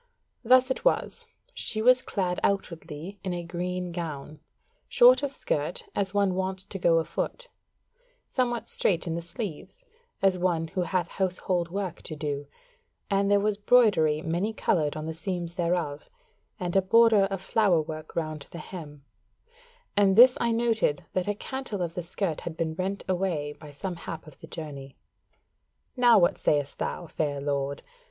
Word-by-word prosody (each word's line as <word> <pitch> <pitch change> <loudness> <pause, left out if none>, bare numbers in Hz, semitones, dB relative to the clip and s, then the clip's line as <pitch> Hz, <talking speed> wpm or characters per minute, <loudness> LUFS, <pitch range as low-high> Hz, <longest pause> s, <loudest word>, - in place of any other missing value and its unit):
Thus 255 +2 +5
it - - -2
was: - - 0 0.3
she 220 - -2
was 250 +3 +5
clad 185 -7 -2
outwardly 180 -1 -3
in 185 -2 -2
a 175 - -4
green 180 +1 -3
gown, 155 -3 -6 0.5
short 250 +2 +7
of 285 -2 -2
skirt - - -2
as 195 -1 0
of 200 - -14
one 200 -2 +3
wont 190 +1 -3
to 195 - -4
go 170 -1 +4
afoot; - - -3 0.8
somewhat 240 -2 -1
straight 170 -4 +1
in 165 - -2
the 170 - -3
sleeves 210 - -7 0.3
as 195 -2 +3
of - - -8
one 165 -3 +1
who 185 +2 -2
hath 175 0 0
household 180 -2 -1
work 190 -1 -4
to 155 - -6
do, 145 -1 -3 0.6
and 200 0 +2
there 205 0 +5
was 210 0 0
broidery 205 -9 +4
many 175 +7 -1
coloured 155 -8 0
on 155 - -4
the 160 - -3
seams 175 0 -4
thereof, 170 -4 -2 0.5
and 175 0 -3
a 195 - +6
border 220 +1 +5
of 195 -1 -3
flower 190 -2 +2
work 155 0 -6
round 155 -3 -3
the - - -9
hem: 150 -4 -9 0.9
and 200 -2 +4
this 250 +3 +9
I 235 - +2
noted, 225 -10 +1
that 185 0 -1
a 205 - 0
cantle 225 -5 -4
of 170 -1 -4
the 180 - -3
skirt 175 -1 -3
had 165 -1 -6
been 160 -1 -1
rent 190 +3 -3
away 175 -6 -1
by 150 0 -13
some 170 +5 -5
hap 165 -1 -7
of 155 -3 -15
the - - -11
journey. 140 -4 -8 1.0
Now 245 -2 +6
what 175 -3 +3
sayest 145 -2 0
thou, - - -3
fair 150 -3 -2
lord? 140 0 -2
180 Hz, 170 wpm, -27 LUFS, 160-205 Hz, 1.0 s, this